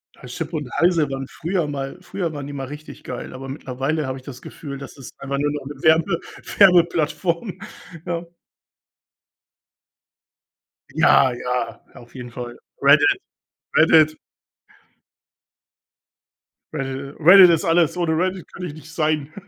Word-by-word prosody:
Ja, 125 Hz, -, -13 dB
Chip 155 Hz, +6 st, -6 dB
und 150 Hz, -4 st, -3 dB
Heise 165 Hz, -4 st, +3 dB
waren 135 Hz, 0 st, -4 dB
früher 170 Hz, -1 st, -2 dB
mal 140 Hz, +1 st, -5 dB
früher 175 Hz, -3 st, -4 dB
waren 145 Hz, -2 st, -6 dB
die 145 Hz, -, -7 dB
mal 135 Hz, -1 st, -4 dB
richtig 150 Hz, +2 st, -10 dB
geil, 125 Hz, -, -7 dB
aber 135 Hz, +1 st, -8 dB
mittlerweile 135 Hz, +2 st, -3 dB
habe 130 Hz, 0 st, -4 dB
ich 130 Hz, -, -13 dB
das 130 Hz, -2 st, -10 dB
Gefühl, 140 Hz, -3 st, -8 dB
das 140 Hz, 0 st, -10 dB
ist 135 Hz, -, -11 dB
einfach 140 Hz, 0 st, -3 dB
nur 145 Hz, +1 st, 0 dB
noch 145 Hz, -2 st, -5 dB
'ne 145 Hz, -, -7 dB
Werbe 165 Hz, +2 st, +3 dB, 0.4 s
Werbeplattform, 170 Hz, 0 st, +3 dB, 0.5 s
ja. 170 Hz, 0 st, -3 dB, 2.7 s
Ja, 130 Hz, -2 st, +5 dB
ja, 125 Hz, +1 st, -3 dB
auf 120 Hz, +2 st, -15 dB
jeden 125 Hz, -2 st, -8 dB
Fall. 120 Hz, 0 st, -7 dB, 0.2 s
Reddit. 395 Hz, -1 st, +5 dB, 0.6 s
Reddit. 155 Hz, -1 st, +5 dB, 2.6 s
Äh, -, -, -4 dB, 0.4 s
Reddit 180 Hz, +3 st, +9 dB
ist 165 Hz, -2 st, +2 dB
alles, 165 Hz, 0 st, +2 dB
ohne 170 Hz, -2 st, 0 dB
Reddit 185 Hz, +1 st, -2 dB
könnte 180 Hz, -1 st, -6 dB
ich 150 Hz, -, -8 dB
nicht 155 Hz, +1 st, -13 dB
sein. 155 Hz, -2 st, -1 dB
155 Hz, 140 wpm, -21 LUFS, 135-170 Hz, 2.7 s, Reddit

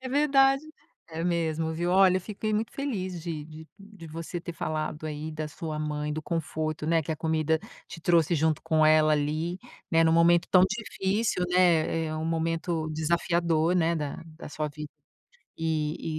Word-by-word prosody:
É 260 Hz, -, -6 dB
verdade. 275 Hz, 0 st, +4 dB, 0.5 s
É 165 Hz, 0 st, -4 dB
mesmo, 165 Hz, -2 st, 0 dB
viu. 175 Hz, +2 st, -1 dB
Olha, 185 Hz, 0 st, +5 dB
eu -, -, -9 dB
fiquei 215 Hz, +3 st, -4 dB
muito 220 Hz, +2 st, -1 dB
feliz 190 Hz, -11 st, -3 dB
de 160 Hz, -3 st, -5 dB
de 155 Hz, +1 st, -11 dB
de 200 Hz, -4 st, -13 dB
você 165 Hz, +2 st, -6 dB
ter 170 Hz, -, -6 dB
falado 155 Hz, -1 st, -3 dB
aí 155 Hz, +1 st, -5 dB
da 155 Hz, 0 st, -4 dB
sua 155 Hz, 0 st, -6 dB
mãe, 150 Hz, 0 st, -2 dB
do 155 Hz, -, -4 dB
conforto, 155 Hz, -1 st, -3 dB
né, 165 Hz, 0 st, +2 dB
que 150 Hz, -, -6 dB
a 160 Hz, -, -1 dB
comida 160 Hz, 0 st, +1 dB, 0.3 s
te -, -, -9 dB
trouxe 170 Hz, 0 st, +3 dB
junto 160 Hz, 0 st, +1 dB
com 155 Hz, -1 st, +3 dB
ela 155 Hz, 0 st, +5 dB
ali, 155 Hz, +4 st, -1 dB, 0.3 s
né, 165 Hz, -1 st, +4 dB
em 165 Hz, -, +4 dB
um 160 Hz, -, +3 dB
momento 170 Hz, +1 st, +4 dB
tão 185 Hz, -1 st, +6 dB
difícil, 210 Hz, -2 st, -1 dB
né, 170 Hz, -3 st, +3 dB
eh, 155 Hz, -, -4 dB
um 155 Hz, 0 st, -3 dB
momento 165 Hz, 0 st, -1 dB
desafiador, 170 Hz, +1 st, +1 dB
né, 170 Hz, -1 st, +2 dB
da 150 Hz, -3 st, -4 dB, 0.2 s
da -, -, -8 dB
sua 150 Hz, 0 st, -3 dB
vida. 150 Hz, 0 st, -8 dB, 0.7 s
E 155 Hz, 0 st, -2 dB
165 Hz, 180 wpm, -27 LUFS, 155-175 Hz, 0.7 s, tão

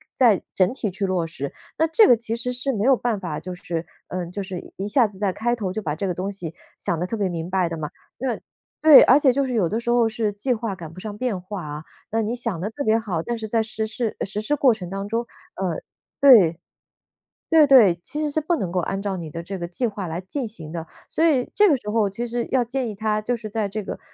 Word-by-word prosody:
再 230 Hz, -7 st, +4 dB
整 185 Hz, +4 st, +3 dB
体 230 Hz, -5 st, -2 dB
去 195 Hz, +2 st, -3 dB
落 180 Hz, -3 st, 0 dB
实， 140 Hz, -4 st, -6 dB, 0.2 s
那 320 Hz, -, +4 dB
这 325 Hz, +7 st, +5 dB
个 245 Hz, -, +6 dB
其 230 Hz, 0 st, -2 dB
实 240 Hz, +1 st, -3 dB
是 250 Hz, +2 st, -1 dB
没 205 Hz, -3 st, -1 dB
有 265 Hz, +2 st, +6 dB
办 230 Hz, -4 st, -1 dB
法 170 Hz, -5 st, -4 dB
就 185 Hz, -, -6 dB
是 170 Hz, -1 st, -4 dB, 0.2 s
嗯， 180 Hz, -1 st, -4 dB
就 200 Hz, -, -4 dB
是 185 Hz, -2 st, -7 dB
一 195 Hz, -, -3 dB
下 240 Hz, +3 st, +4 dB
子 200 Hz, -2 st, -14 dB
在 200 Hz, -2 st, +1 dB
开 240 Hz, +5 st, 0 dB
头 200 Hz, -6 st, -3 dB
就 215 Hz, +3 st, -4 dB
把 150 Hz, -4 st, -1 dB
这 180 Hz, +6 st, -3 dB
个 180 Hz, -, -2 dB
东 190 Hz, +3 st, -3 dB
西 170 Hz, -5 st, -7 dB, 0.2 s
想 165 Hz, -, -1 dB
得 175 Hz, -, -1 dB
特 205 Hz, -, -3 dB
别 200 Hz, -4 st, 0 dB
明 170 Hz, -1 st, -4 dB
白 185 Hz, -2 st, +1 dB
的 165 Hz, -, -4 dB
嘛。 150 Hz, -2 st, -5 dB, 0.3 s
那 250 Hz, -2 st, -2 dB, 0.4 s
对， 310 Hz, -3 st, +10 dB
而 260 Hz, -, +7 dB
且 275 Hz, -3 st, +4 dB
就 280 Hz, +2 st, +1 dB
是 255 Hz, -2 st, -2 dB
有 200 Hz, -6 st, +2 dB
的 220 Hz, +7 st, -1 dB
时 235 Hz, -, -4 dB
候 240 Hz, -1 st, +4 dB
是 220 Hz, -1 st, -1 dB
计 205 Hz, +6 st, -1 dB
划 225 Hz, -3 st, -3 dB
赶 165 Hz, -3 st, -9 dB
不 185 Hz, -, -10 dB
上 210 Hz, +1 st, -6 dB
变 220 Hz, -6 st, -2 dB
化 185 Hz, 0 st, -6 dB
啊， 150 Hz, +1 st, -6 dB, 0.3 s
那 225 Hz, +1 st, +1 dB
你 220 Hz, +2 st, -1 dB
想 230 Hz, -9 st, -2 dB
得 200 Hz, -, -2 dB
特 285 Hz, +6 st, -5 dB
别 220 Hz, -1 st, +3 dB
好， 185 Hz, -7 st, -3 dB
但 240 Hz, -, -2 dB
是 225 Hz, -1 st, -5 dB
在 225 Hz, +1 st, +1 dB
实 220 Hz, 0 st, -3 dB
施 225 Hz, 0 st, -3 dB
实 200 Hz, +2 st, -4 dB
施 255 Hz, +8 st, 0 dB
过 260 Hz, -5 st, +4 dB
程 180 Hz, -4 st, -8 dB
当 195 Hz, +1 st, -4 dB
中 230 Hz, +3 st, -1 dB, 0.3 s
呃， 180 Hz, -4 st, -2 dB, 0.4 s
对， 200 Hz, -, +7 dB, 0.9 s
对 320 Hz, -2 st, +7 dB
对， 235 Hz, -11 st, +7 dB
其 295 Hz, -, -3 dB
实 305 Hz, -1 st, 0 dB
是 310 Hz, -, 0 dB
不 320 Hz, +3 st, 0 dB
能 190 Hz, -, -2 dB
够 180 Hz, -, -1 dB
按 195 Hz, +3 st, -3 dB
照 200 Hz, -2 st, -2 dB
你 170 Hz, -3 st, -6 dB
的 165 Hz, +2 st, -6 dB
这 190 Hz, +3 st, -6 dB
个 170 Hz, -, -3 dB
计 210 Hz, +8 st, -1 dB
划 200 Hz, -3 st, -5 dB
来 165 Hz, +1 st, -4 dB
进 240 Hz, +8 st, -4 dB
行 170 Hz, -9 st, -8 dB
的， 165 Hz, 0 st, -5 dB, 0.2 s
所 325 Hz, -, 0 dB
以 270 Hz, -6 st, +2 dB
这 415 Hz, 0 st, +5 dB
个 300 Hz, -, +4 dB
时 210 Hz, -5 st, -6 dB
候 215 Hz, -2 st, +2 dB
其 195 Hz, +5 st, -4 dB
实 240 Hz, 0 st, -2 dB
要 260 Hz, -, +4 dB
建 245 Hz, +1 st, -2 dB
议 215 Hz, -, -5 dB
他 215 Hz, +1 st, 0 dB
就 240 Hz, +4 st, -1 dB
是 220 Hz, -2 st, -6 dB
在 215 Hz, -1 st, -1 dB
这 215 Hz, +2 st, -4 dB
个， -, -, -6 dB
210 Hz, 290 characters per minute, -23 LUFS, 185-240 Hz, 0.9 s, 对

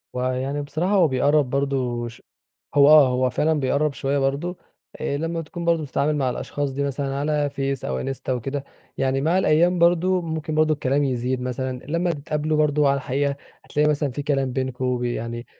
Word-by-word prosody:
هو 125 Hz, +1 st, 0 dB
يعني 135 Hz, +3 st, -2 dB
بصراحة 155 Hz, +7 st, -1 dB
هو 185 Hz, -5 st, +5 dB
بيقرب 140 Hz, +1 st, +2 dB
برضه 130 Hz, -3 st, -1 dB
ش 115 Hz, -, -12 dB, 0.5 s
هو 140 Hz, 0 st, +7 dB
آه، 150 Hz, -3 st, +8 dB
هو 125 Hz, 0 st, +1 dB
فعلًا 150 Hz, +5 st, +1 dB
بيقرب 140 Hz, +2 st, +1 dB
شوية 140 Hz, +1 st, -1 dB
برضو 140 Hz, +7 st, -1 dB, 0.4 s
آآ، 140 Hz, -2 st, -1 dB
لما 165 Hz, +2 st, -2 dB
تكون 170 Hz, +2 st, -7 dB
برضه 170 Hz, -1 st, +2 dB
بتتعامل 145 Hz, +1 st, 0 dB
مع 135 Hz, -3 st, 0 dB
الأشخاص 140 Hz, +3 st, -3 dB
دي 140 Hz, +2 st, -2 dB
مثلًا 140 Hz, 0 st, -2 dB
على 145 Hz, +1 st, 0 dB
فيس 135 Hz, -1 st, -3 dB
أو 65 Hz, -, -2 dB
إنستا 135 Hz, -, -3 dB
وكده، 135 Hz, +3 st, -3 dB, 0.3 s
يعني 135 Hz, 0 st, 0 dB
مع 165 Hz, +5 st, +2 dB
الأيام 175 Hz, 0 st, +3 dB
برضه 175 Hz, +2 st, +3 dB
ممكن 160 Hz, -1 st, -4 dB
برضه 155 Hz, 0 st, +3 dB
الكلام 140 Hz, -1 st, 0 dB
يزيد 125 Hz, -1 st, -1 dB
مثلًا 125 Hz, 0 st, -3 dB
لما 170 Hz, +3 st, 0 dB
تتقابلوا 150 Hz, 0 st, -2 dB
برضه 150 Hz, -1 st, +3 dB
على 140 Hz, -, +3 dB
الحقيقة 140 Hz, +1 st, -1 dB, 0.3 s
هتلاقي 150 Hz, +1 st, +1 dB
مثلًا 145 Hz, -1 st, 0 dB
في 145 Hz, +4 st, -5 dB
كلام 135 Hz, -3 st, 0 dB
بينكم 130 Hz, -1 st, -1 dB
ب -, -, -3 dB
يعني 120 Hz, 0 st, -3 dB
140 Hz, 190 wpm, -23 LUFS, 130-155 Hz, 0.5 s, آه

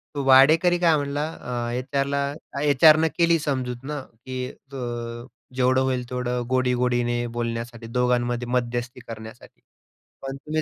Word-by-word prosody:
तो 140 Hz, -, -2 dB
वाढेकरी 155 Hz, +7 st, +6 dB
काय 165 Hz, -3 st, +4 dB
म्हटला 145 Hz, +1 st, -2 dB, 0.2 s
अ, 120 Hz, -1 st, -3 dB
एचआरला, 140 Hz, +2 st, -1 dB, 0.3 s
एचआरने 155 Hz, +2 st, +6 dB
केली 170 Hz, -1 st, +4 dB
समजूत 130 Hz, -4 st, -3 dB
ना 150 Hz, -, -3 dB, 0.3 s
की, 130 Hz, -1 st, -4 dB, 0.3 s
अ, 120 Hz, -2 st, -5 dB, 0.3 s
जेवढं 130 Hz, 0 st, +3 dB
होईल 130 Hz, -1 st, 0 dB
तेवढं 125 Hz, -1 st, -2 dB
गोडी-गोडीने 125 Hz, -1 st, +1 dB
बोलण्यासाठी 115 Hz, 0 st, -4 dB
दोघांमध्ये 120 Hz, 0 st, 0 dB
मध्यस्थी 120 Hz, 0 st, -2 dB
करण्यासाठी, 110 Hz, +1 st, -10 dB, 0.6 s
पण 135 Hz, 0 st, -5 dB
तुम्ही 155 Hz, +3 st, -2 dB
125 Hz, 125 wpm, -24 LUFS, 120-140 Hz, 0.6 s, वाढेकरी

